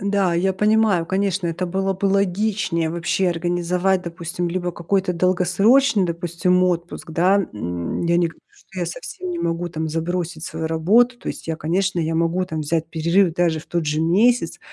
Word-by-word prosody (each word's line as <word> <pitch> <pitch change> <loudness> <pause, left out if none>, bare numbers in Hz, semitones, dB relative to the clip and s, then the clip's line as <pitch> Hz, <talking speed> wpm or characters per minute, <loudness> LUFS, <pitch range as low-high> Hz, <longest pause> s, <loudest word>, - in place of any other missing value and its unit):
Да, 200 -3 +1
я 190 +3 +1
понимаю, 210 -3 +2
конечно, 190 -1 0
это 170 +2 -2
было 195 +2 -1
бы 190 +1 -2
логичнее 195 -3 0
вообще 170 +2 0
организовать, 175 +2 0
допустим 170 0 -4
либо 175 0 -2
какой-то 185 +2 -1
долгосрочный, 185 +6 +3
допустим 175 +2 0
отпуск, 175 -1 -3
да. 180 +5 +3 0.2
М, 90 -4 -4
я 170 0 +3
не 175 - +3
говорю, 165 - -11
что 415 -1 -11
я - - -1
совсем 375 -7 -6
не 345 - -3
могу 175 - -2
там 160 -1 -4
забросить 165 +1 -3
свою 160 -2 -4
работу. 215 +11 +3
То - - -7
есть - - -6
я, 160 - -1
конечно, 180 +3 0
я 165 0 -1
могу 170 +2 +1
там 160 -3 -4
взять 160 +1 -1
перерыв 170 +3 +2
даже 170 -3 +1
в - - -17
тот 170 -3 -2
же 150 +1 0
месяц. 190 +3 +2
175 Hz, 180 wpm, -21 LUFS, 165-195 Hz, 0.2 s, долгосрочный